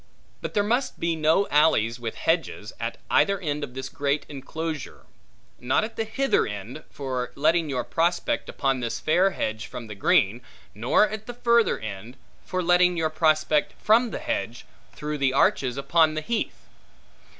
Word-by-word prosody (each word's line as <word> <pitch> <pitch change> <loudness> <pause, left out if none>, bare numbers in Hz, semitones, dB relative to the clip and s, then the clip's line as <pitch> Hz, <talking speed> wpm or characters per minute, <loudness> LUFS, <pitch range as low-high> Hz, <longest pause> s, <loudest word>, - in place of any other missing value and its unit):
But - - -6
there 205 - +3
must 240 +6 -1
be 170 0 0
no 160 +5 +2
alleys 125 -6 +3
with 115 -2 -5
hedges, 160 -9 -1
at 115 0 -4
either 200 -1 +3
end 150 -4 -3
of 125 - -7
this 130 0 -4
great 140 +1 -1
enclosure; 155 +1 -6 0.5
not 125 +11 +1
at 225 +1 -5
the 225 - -2
hither 270 +5 +1
end, 105 +8 -7
for 130 -3 -4
letting 160 +2 +2
your 125 -3 -1
prospect 170 +1 0
upon 135 -1 0
this 120 -2 -3
fair 180 +5 +3
hedge 110 - -3
from 120 - -8
the 105 - -8
green; 100 +2 +2 0.3
nor 120 - +3
at 215 0 -7
the 245 - -6
further 235 -1 +3
end, 110 +4 -8 0.3
for 185 -1 -2
letting 180 0 +4
your 160 -1 0
prospect 155 -1 +2
from 230 +3 +4
the - - -4
hedge, 295 - -4 0.3
through 150 0 -5
the 135 -1 +2
arches 130 -1 +2
upon 155 +3 +3
the 155 - -2
heath. 225 +7 -3
155 Hz, 170 wpm, -25 LUFS, 125-180 Hz, 0.5 s, letting